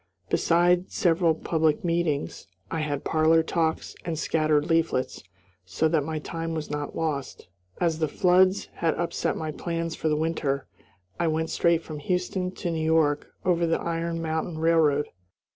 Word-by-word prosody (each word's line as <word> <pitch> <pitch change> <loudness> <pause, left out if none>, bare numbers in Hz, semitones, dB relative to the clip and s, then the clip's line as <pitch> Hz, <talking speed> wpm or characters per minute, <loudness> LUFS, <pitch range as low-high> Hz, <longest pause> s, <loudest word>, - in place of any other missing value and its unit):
Beside 175 +2 +3
several 170 -2 +2
public 160 -1 0
meetings, 165 - -1 0.2
I 165 - -1
had 145 -2 -2
parlor 160 +1 +3
talks 160 -1 -1
and 165 -2 -3
scattered 155 -1 +1
leaflets, 165 -6 0 0.4
so 90 - 0
that 155 -2 +2
my 160 +1 -3
time 165 +1 -4
was 155 -2 -4
not 145 -1 -4
lost. 145 - -3 0.3
As 165 -2 +1
the 155 - +1
floods 185 +3 +3
had 165 -2 0
upset 170 0 -1
my 155 -1 -3
plans 165 +1 -3
for 160 - -1
the 150 - +1
winter, 150 -4 -1 0.5
I 170 - +1
went 160 +1 -1
straight 170 -1 +2
from 155 -2 -7
Houston 180 +3 -1
to 180 -1 -4
New 160 -1 -2
York 160 -2 +2 0.2
over 170 -2 +2
the 165 - +1
Iron 165 0 -2
Mountain 160 +1 -2
Railroad. 160 -3 +3
160 Hz, 160 wpm, -26 LUFS, 155-170 Hz, 0.5 s, Beside